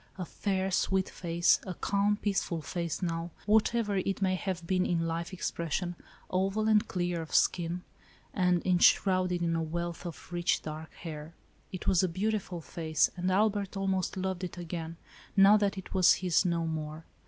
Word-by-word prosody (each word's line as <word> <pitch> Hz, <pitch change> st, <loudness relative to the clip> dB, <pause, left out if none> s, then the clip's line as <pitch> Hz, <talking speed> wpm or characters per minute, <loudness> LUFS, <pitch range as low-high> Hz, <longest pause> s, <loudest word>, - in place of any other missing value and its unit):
A 185 Hz, -, -4 dB
fair, 190 Hz, +1 st, -2 dB
sweet 190 Hz, 0 st, +1 dB
face, 170 Hz, -1 st, +2 dB
a 185 Hz, -, -4 dB
calm, 200 Hz, +3 st, +1 dB
peaceful 190 Hz, -6 st, -1 dB
face 170 Hz, +2 st, -3 dB
now, 165 Hz, -1 st, -2 dB, 0.2 s
whatever 215 Hz, 0 st, +2 dB
it 190 Hz, +1 st, -1 dB
may 190 Hz, -1 st, +2 dB
have 185 Hz, -2 st, -3 dB
been 185 Hz, +1 st, +1 dB
in 165 Hz, -2 st, 0 dB
life 165 Hz, +1 st, -3 dB
expression, 175 Hz, -1 st, -3 dB, 0.4 s
oval 195 Hz, +4 st, +1 dB
and 215 Hz, 0 st, +4 dB
clear 175 Hz, -2 st, -1 dB
of 160 Hz, -, -5 dB
skin, 175 Hz, 0 st, +2 dB, 0.5 s
and 180 Hz, -2 st, +2 dB
enshrouded 185 Hz, 0 st, +3 dB
in 165 Hz, -1 st, +1 dB
a 165 Hz, -, 0 dB
wealth 170 Hz, +2 st, -4 dB
of 170 Hz, +1 st, -10 dB
rich 175 Hz, 0 st, +1 dB
dark 155 Hz, +1 st, -7 dB
hair. 160 Hz, -1 st, -8 dB, 0.4 s
It 185 Hz, -, -6 dB
was 185 Hz, -3 st, +4 dB
a 185 Hz, -, +1 dB
beautiful 190 Hz, -1 st, -2 dB
face 160 Hz, -1 st, 0 dB
and 180 Hz, +1 st, -1 dB
Albert 200 Hz, 0 st, +1 dB
almost 190 Hz, -1 st, -1 dB
loved 190 Hz, -1 st, -2 dB
it 180 Hz, -, -5 dB
again, 165 Hz, -1 st, -5 dB, 0.4 s
now 195 Hz, +2 st, +8 dB
that 200 Hz, -1 st, 0 dB
it 190 Hz, -, -7 dB
was 185 Hz, -2 st, +6 dB
his 180 Hz, 0 st, +1 dB
no 170 Hz, -2 st, 0 dB
more. 155 Hz, 0 st, -4 dB
180 Hz, 170 wpm, -30 LUFS, 170-195 Hz, 0.5 s, now